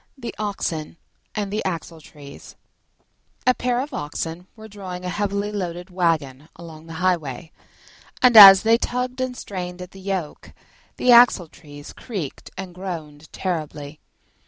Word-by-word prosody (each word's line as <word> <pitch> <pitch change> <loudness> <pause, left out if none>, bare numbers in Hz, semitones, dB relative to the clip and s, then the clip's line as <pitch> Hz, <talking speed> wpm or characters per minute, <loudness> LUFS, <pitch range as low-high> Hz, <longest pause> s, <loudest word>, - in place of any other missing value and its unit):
THE 240 -3 -7
OXEN 170 -7 -4 0.4
AND 205 -2 -3
THE 215 - -2
AXLETREES 160 -5 -8 0.9
A 255 - +5
pair 245 0 -1
of 285 +1 -7
Oxen 165 +3 -5
were 220 -1 -12
drawing 185 -3 -8
a - - -2
heavily 205 +1 -2
loaded 180 -2 -5
waggon 160 -5 -1
along 165 -1 -12
the 165 - -9
highway, 165 -3 -1 0.7
and, 250 -2 +4
as 195 -3 +11
they 225 +1 +4
tugged 250 +1 -3
and 255 -1 -3
strained 180 -2 -6
at 180 +1 -9
the 195 - -13
yoke, 185 -5 -5 0.4
the 250 - +3
Axletrees 165 -11 +3
creaked 195 - -7
and 185 -2 -7
groaned 160 -5 -8
terribly. 155 -4 -5
180 Hz, 135 wpm, -22 LUFS, 160-210 Hz, 0.9 s, as